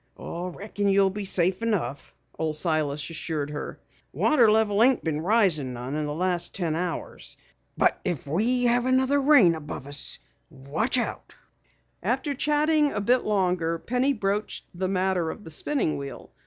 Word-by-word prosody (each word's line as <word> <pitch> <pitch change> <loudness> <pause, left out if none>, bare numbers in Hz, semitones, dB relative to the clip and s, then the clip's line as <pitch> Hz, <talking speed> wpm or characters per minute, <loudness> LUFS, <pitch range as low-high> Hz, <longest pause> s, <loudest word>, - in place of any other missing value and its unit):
"Reckon 200 +4 -4
you'll 195 0 +4
be 205 +1 -5
safe 185 +1 0
enough," 180 - -2 0.2
Old 155 -1 0
Silas 150 -3 -1
assured 155 -2 -3
her. 145 - -6 0.3
"Water 255 -8 +4
level 215 -1 +2
ain't 260 +1 +3
been 155 -1 -1
risin' 175 - +2
none 125 +3 -6
in 150 -1 -2
the 145 - -3
last 175 0 -1
ten 170 -5 -1
hours. 175 +1 -4 0.4
But - - +2
if 175 -8 -3
we 225 - +1
have 245 +1 +2
another 260 +2 +3
rain 270 - +6
above 150 -4 -7
us 145 0 0 0.3
look 155 - -1
out." 245 - -3 0.7
After 290 - -1
chatting 300 +1 +2
a 205 - -2
bit 245 +5 +2
longer, 180 -5 +1
Penny 250 +9 0
broached 210 -3 -2
the 185 +1 -2
matter 185 -3 0
of 210 - -7
the 160 - -10
spinning 210 - -1
wheel. 140 -1 -8
185 Hz, 155 wpm, -26 LUFS, 155-230 Hz, 0.7 s, rain